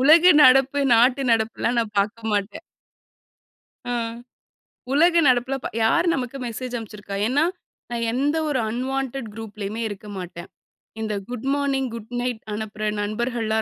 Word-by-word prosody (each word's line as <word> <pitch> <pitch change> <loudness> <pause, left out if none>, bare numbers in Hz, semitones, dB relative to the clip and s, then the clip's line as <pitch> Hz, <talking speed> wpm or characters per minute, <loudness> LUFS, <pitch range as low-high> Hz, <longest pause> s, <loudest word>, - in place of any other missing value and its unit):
உலக 325 +6 +7
நடப்பு, 270 +2 +5
நாட்டு 250 +4 +4
நடப்புலாம் 230 +1 +1
நான் 215 -2 -4
பாக்க 205 +3 0
மாட்டேன். 205 +10 -2 1.3
ம். 230 -1 -2 0.8
உலக 335 +4 +5
நடப்புல 255 +1 +2
ப - - -1 0.2
யார் 340 +10 +3
நமக்கு 260 -1 -3
மெசேஜ் 245 +2 -5
அனுப்ச்சிருக்கா! 210 -3 -7
ஏன்னா? 280 +5 +2 0.5
நான் 235 -1 -2
எந்த 285 +5 +1
ஒரு 275 -3 0
அன்வான்டட் 265 +1 -3
குரூப்லயுமே 215 0 -6
இருக்க 205 +1 -9
மாட்டேன். 175 -1 -8 0.5
இந்த 215 -1 -2 0.2
குட் 245 +1 -5
மார்னிங், 275 -2 0
குட் 230 0 -8
நைட் 245 -2 -2
அனுப்புற 215 0 -3
நண்பர்கள்லாம் 220 +1 -1
235 Hz, 130 wpm, -23 LUFS, 220-270 Hz, 1.3 s, உலக